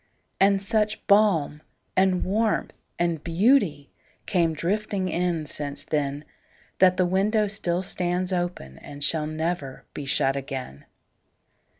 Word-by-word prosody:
And 195 0 +4
such 210 +1 0
balm 195 -8 +3 0.3
and 185 -1 +3
warmth 215 +3 0 0.2
and 170 -3 -1
beautyCame 170 - +1
drifting 190 +3 -1
in 175 -3 -1
since 145 -1 -5
then, 145 -1 -2 0.5
That 185 -1 +5
the 185 - +3
window 205 +4 +2
still 185 -3 -1
stands 180 0 -2
openAnd 145 - -4
shall 150 +1 +1
never 155 -3 -3
be 145 - -6
shut 135 -1 +2
again. 130 - -6
175 Hz, 110 wpm, -25 LUFS, 150-195 Hz, 0.5 s, That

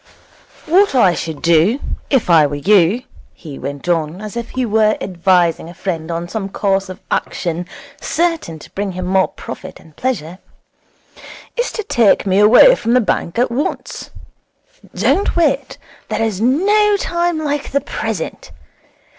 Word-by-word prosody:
'What 360 0 +3
I 195 -8 +5
should 160 -3 -5
do, 170 - +3 0.3
if 270 -5 +2
I 160 -4 +5
were 145 - -4
you,' 195 - +3 0.3
he 150 -5 -10
went 140 +4 -6
on, 165 0 0
as 215 +1 -8
if 235 -1 -4
he 255 -1 -2
were 215 -1 +2
advising 175 -2 +1
a 175 - -12
friend 170 -4 -4
on 170 +1 -3
some 195 +1 -4
course 195 -1 -1
of 185 +1 -8
action 175 0 -2 0.3
certain 330 - -1
to - - -14
bring 200 -1 -3
him 185 +1 -3 0.2
profit - - -9
and 155 -2 -19
pleasure, 190 -9 -3 1.2
'is 485 0 -1
to 435 - -4
take 235 - +3
me 190 0 +2
away 240 - +7
from 235 - 0
the - - +6
bank 200 -5 -1
at 245 0 +1
once. 290 - -4 0.9
Don't 400 - +1
wait. 325 -5 0 0.3
There - - -1
is 215 -3 -2
no 405 - +3
time 345 -2 -1
like 295 -2 -2
the 280 - +1
present. 220 - -5
205 Hz, 155 wpm, -17 LUFS, 175-265 Hz, 1.2 s, away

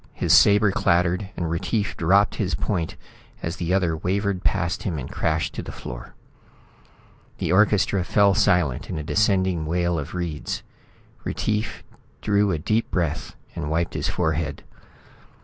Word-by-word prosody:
His - - +1
sabre 105 0 +6
clattered, 90 +2 +1
and 85 - -1
Retief 95 +6 -1
dropped 100 +5 +3
his 95 -2 0
point 85 -6 -2 0.5
as 85 +2 -3
the 85 -1 -2
other 90 -4 +2
wavered 95 +3 -1
past 95 -3 0
him 90 -6 -2
and 65 - -5
crashed 80 0 -1
to - - -4
the - - -7
floor. - - -9 1.2
The - - -1
orchestra 100 -1 +3
fell 100 +2 +4
silent 85 -8 +2
in - - -3
a 75 - -3
descending 95 -3 +1
wail 85 0 0
of 75 +4 -6
reeds. 85 -4 -3 0.6
Retief 110 0 -2 0.4
drew 105 -1 +2
a 85 - 0
deep 110 +9 0
breath 85 -3 -2 0.2
and 80 -4 -3
wiped 85 +2 0
his - - -1
forehead. 75 -1 -1
90 Hz, 150 wpm, -24 LUFS, 80-100 Hz, 1.2 s, sabre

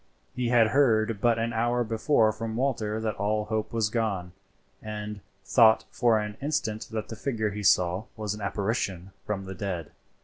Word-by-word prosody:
He 125 -2 -1
had 115 -2 +5
heard 110 -6 +2
but 120 -1 +3
an 115 +1 -1
hour 120 +2 +1
before 115 0 +2
from 110 +1 -5
Walter 115 -4 -1
that 110 -1 -1
all 105 +1 0
hope 110 0 -2
was 115 -3 +1
gone, 100 -6 -1 0.5
and 105 -1 -6 0.3
thought 110 -1 +5
for 120 -3 +3
an 105 -1 -4
instant 125 -7 -2
that 110 -1 -4
the 115 - -5
figure 110 -3 -2
he 105 +1 -5
saw 90 0 +3
was 105 -2 -2
an 105 - -8
apparition 100 -2 -2 0.2
from 95 -2 -2
the 95 - -6
dead. 90 -4 -4
110 Hz, 175 wpm, -27 LUFS, 105-115 Hz, 0.5 s, had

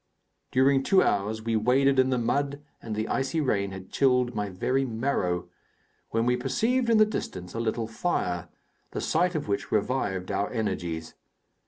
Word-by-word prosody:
During 135 +1 +4
two 190 +8 +4
hours 105 +2 0
we 115 0 0
waded 130 +5 +3
in 130 0 +4
the 130 - +1
mud 140 +4 -1 0.2
and 110 -2 -5
the 110 +1 -2
icy 135 +4 0
rain 100 -9 +1
had 95 0 -9
chilled 125 -2 +2
my 105 -2 -2
very 130 +9 0
marrow, 110 -8 -1 0.6
when 115 +1 0
we 125 0 +3
perceived 225 - 0
in 230 - +5
the 215 - +7
distance 90 - -5
a 115 - -3
little 115 0 -1
fire, 90 - -2 0.4
the - - -2
sight 175 +2 +1
of 150 - -2
which 100 -1 -2
revived 100 -4 0
our 100 - 0
energies. 85 -8 -3
120 Hz, 170 wpm, -27 LUFS, 100-135 Hz, 0.6 s, the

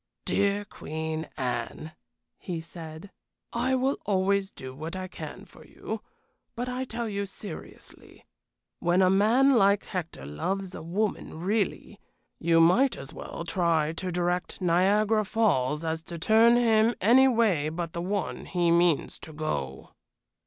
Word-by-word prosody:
"Dear 200 +1 +1
Queen 160 -2 -5
Anne," 125 +5 -3 0.5
he 175 -3 -4
said, 160 +2 -10 0.4
"I 255 +3 +1
will 260 +2 0
always 195 0 +1
do 130 -8 -9
what 155 +6 -6
I 185 0 -4
can - - -9
for - - -16
you. - - -6 0.5
But 245 +2 -3
I 250 +1 -3
tell 235 -1 -4
you 200 -1 -3
seriously, 195 -3 -11 0.5
when 175 +2 +3
a 185 - +4
man 225 +8 +4
like 200 -3 +4
Hector 170 - -5
loves 185 - -3
a - - -7
woman 180 -1 -2
really, 200 +1 -1 0.4
you 165 0 +3
might 230 +11 +4
as 135 +4 -9
well 170 - -7
try 165 -3 +1
to 180 +2 -4
direct 175 +1 -1
Niagara 200 +5 +3
Falls 165 - +1
as 160 0 -2
to 170 - -6
turn 225 +7 +5
him 225 -1 +3
any 250 +6 +6
way 215 - +2
but 165 +1 -4
the 170 - -3
one 195 +2 -3
he 175 -2 +1
means 170 -2 +2
to 160 - -11
go." 70 - -4
185 Hz, 145 wpm, -27 LUFS, 160-215 Hz, 0.5 s, any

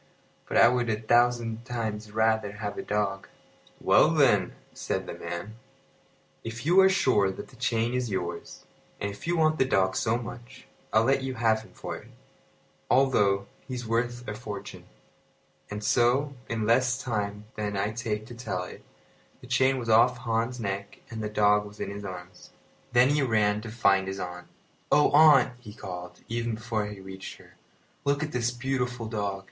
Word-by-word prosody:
"But - - -1
I 115 - +8
would 120 -1 +1
a 110 -1 0
thousand 120 0 +2
times 110 -3 -4
rather 110 -1 +1
have 105 -1 -5
a - - -4
dog." 100 -2 -2 0.5
"Well, - - +5
then," - - +3 0.2
said - - -3
the - - -6
man, 100 +6 -6 0.9
"if 115 +3 -6
you 175 +4 +5
are 190 0 +7
sure 130 - +3
that 95 - -7
the 130 - -17
chain 120 -2 0
is 125 -2 -1
yours, 85 -3 -5 0.3
and 100 - -2
if 100 +9 -10
you 175 0 +1
want 155 -1 +2
the - - +6
dog 95 -7 +1
so 110 +1 +1
much, 120 +2 -9 0.3
I'll 110 +1 +4
let 135 +3 +2
you 130 -1 -4
have 110 -1 +2
him 110 - -15
for - - -6
it, - - -14 0.8
although 105 -7 +3 0.2
he's 125 -2 -5
worth 120 +2 -1
a 105 - -3
fortune." 105 -3 -8 0.8
And 105 +1 -5
so, 125 +6 +2 0.2
in 115 -2 -1
less 125 +2 +3
time 105 -4 -3
than 105 -1 -3
I 100 +2 0
take 110 -1 -3
to 120 - -10
tell 115 -6 -4
it, 90 - -10 0.6
the - - -13
chain 130 +2 +2
was 120 -2 -5
off 115 +2 +5
Hans's 115 +1 -1
neck 100 -2 -4
and 110 -1 -5
the 105 - -3
dog 105 0 +3
was 105 0 -12
in - - -3
his 100 0 -7
arms. 90 -2 -9 0.4
Then 125 +2 +5
he 145 0 +2
ran 105 -4 +2
to 115 - -7
find 100 -4 +2
his 95 0 -4
aunt. 90 -1 -6 0.4
"Oh, 150 - +5
aunt!" 145 -4 +7
he 110 -4 -11
called, 90 -3 -8
even 115 -1 -2
before 110 -2 -2
he 105 -1 -8
reached 95 0 -9
her, - - -18 0.5
"look 140 +1 +1
at 150 - -4
this 120 -1 0
beautiful 125 -1 -2
dog. 100 -3 -2
115 Hz, 180 wpm, -27 LUFS, 105-125 Hz, 0.9 s, I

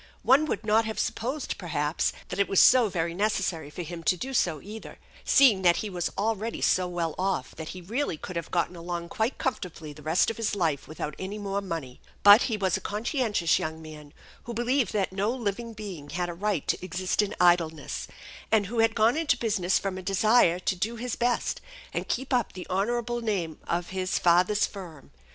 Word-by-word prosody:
One 270 +5 +5
would 215 -6 -3
not 220 +1 +3
have 220 0 -4
supposed, 260 +5 -2
perhaps, 150 -3 -1 0.2
that 180 - -4
it 200 - +3
was 195 - +4
so 245 -4 +7
very 170 -2 -2
necessary 185 -6 -1
for 175 +4 -6
him 170 +1 -7
to 180 - +3
do 265 +8 -5
so, 175 - +1
either, 215 +5 -10 0.3
seeing 235 -9 +5
that 175 -2 +5
he 210 - -3
was 175 -2 -2
already 220 +2 -1
so 185 -1 +2
well 170 -3 -2
off 185 -8 -1
that 160 -1 -7
he - - -8
really 225 - -2
could 180 - -8
have 170 -1 -4
gotten 175 0 0
along 170 0 -5
quite 220 +4 -1
comfortably 170 - -4
the 150 - -13
rest 160 +8 +2
of 225 - -9
his 225 -2 -1
life 160 -9 -1
without 150 0 -5
any 195 +3 -5
more 200 -1 -2
money; 165 -10 -6 0.2
but 205 +3 +9
he 220 - -1
was 190 -3 +1
a - - -3
conscientious 210 - 0
young 160 0 -4
man, 155 -2 -11 0.3
who 235 - -6
believed 240 -1 +1
that 195 -3 -1
no 200 +3 0
living 235 -1 -3
being 190 -9 -8
had 175 +3 -2
a - - -4
right 195 -2 -2
to - - -1
exist 185 +2 0
in 210 0 -3
idleness, 170 -4 +2 0.4
and 220 -2 +4
who 230 +4 -3
had 225 0 +3
gone 225 +3 +4
into 315 -5 +1
business 200 -6 +1
from 190 -1 -3
a - - -6
desire 195 -1 +4
to 185 +1 -1
do 220 +6 -2
his 240 +1 -4
best 240 0 0 0.3
and - - -3
keep 265 +2 -2
up 245 -3 +1
the 180 - -7
honorable 240 +5 -1
name 190 -8 -2
of 170 0 -1
his 185 0 -1
father's 180 +4 +3
firm. 175 -8 -10
195 Hz, 205 wpm, -27 LUFS, 170-225 Hz, 0.4 s, but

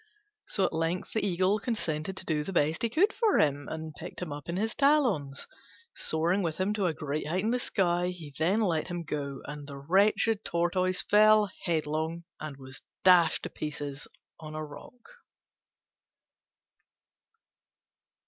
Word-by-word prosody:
So 195 - +1
at - - -1
length 165 +3 -2
the 220 - 0
Eagle 190 +2 +2
consented 190 -7 -2
to - - -8
do 155 -3 0
the 195 - -5
best 160 -2 +1
he 230 - +1
could 380 - +3
for 445 -4 +2
him, 145 -2 +2
and 160 0 -5
picked - - -9
him 175 -5 -4
up 145 +3 -9
in 170 - -2
his 220 +2 -1
talons. 250 - +2 0.5
Soaring 170 +5 0
with 165 -4 -2
him 190 +3 0
to 200 -3 0
a 165 - 0
great 150 0 -3
height 180 +5 0
in 220 - +1
the 250 - +1
sky 180 -6 +1
he 170 -5 -7
then 185 +8 +2
let 170 -7 +1
him 175 -2 -4
go, 140 -3 -4
and 145 -1 -7
the 140 -1 -8
wretched 200 +8 +2
Tortoise 180 +2 0
fell 215 -1 +5
headlong 160 0 -1 0.2
and 155 -3 -6
was 130 -1 -10 0.2
dashed 180 -3 +5
to - - -5
pieces 145 -2 -5 0.3
on 155 -1 -8
a 155 0 -3
rock. 150 +11 -13
170 Hz, 165 wpm, -29 LUFS, 150-200 Hz, 0.5 s, fell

